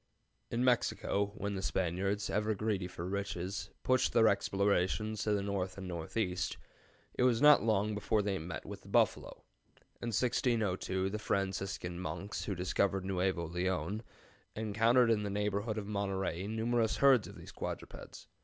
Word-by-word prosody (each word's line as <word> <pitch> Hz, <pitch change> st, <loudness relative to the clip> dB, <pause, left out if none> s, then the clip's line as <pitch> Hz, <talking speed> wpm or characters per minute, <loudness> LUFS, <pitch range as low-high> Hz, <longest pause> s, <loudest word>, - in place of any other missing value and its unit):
] -, -, -46 dB
"In 120 Hz, -, +1 dB
Mexico, 115 Hz, -4 st, +1 dB
when 100 Hz, +1 st, -2 dB
the 95 Hz, -, -3 dB
Spaniards, 95 Hz, +3 st, -1 dB
ever 105 Hz, +1 st, +1 dB
greedy 100 Hz, -3 st, -1 dB
for 85 Hz, -1 st, -7 dB
riches, 95 Hz, 0 st, -3 dB
pushed 130 Hz, 0 st, +2 dB
their 110 Hz, -1 st, +6 dB
explorations 100 Hz, +1 st, +1 dB
to 105 Hz, -, +1 dB
the 100 Hz, -1 st, 0 dB
north 95 Hz, -2 st, -2 dB
and 95 Hz, -1 st, -6 dB
northeast, 90 Hz, +2 st, -2 dB, 0.6 s
it -, -, -3 dB
was 125 Hz, -2 st, +4 dB
not 150 Hz, 0 st, +8 dB
long 105 Hz, -1 st, +1 dB
before 105 Hz, 0 st, +1 dB
they 100 Hz, -1 st, -1 dB
met 85 Hz, +3 st, -6 dB
with -, -, -8 dB
the -, -, -17 dB
buffalo. -, -, +1 dB, 0.6 s
In 120 Hz, -, -3 dB
1602 105 Hz, -5 st, 0 dB
the 105 Hz, -, -3 dB
Franciscan 95 Hz, -3 st, -2 dB
monks 100 Hz, +2 st, -4 dB
who 100 Hz, -, -2 dB
discovered 95 Hz, +2 st, 0 dB
Nuevo 95 Hz, -2 st, 0 dB
Leon 90 Hz, +3 st, -1 dB, 0.5 s
encountered 115 Hz, +3 st, +3 dB
in 110 Hz, -2 st, +2 dB
the 105 Hz, -, -2 dB
neighborhood 105 Hz, +2 st, -1 dB
of 105 Hz, -, -3 dB
Monterey 95 Hz, -2 st, -2 dB
numerous 110 Hz, +1 st, 0 dB
herds 135 Hz, -5 st, +5 dB
of -, -, -11 dB
these -, -, -11 dB
quadrupeds. -, -, -7 dB
100 Hz, 155 wpm, -33 LUFS, 95-110 Hz, 0.6 s, not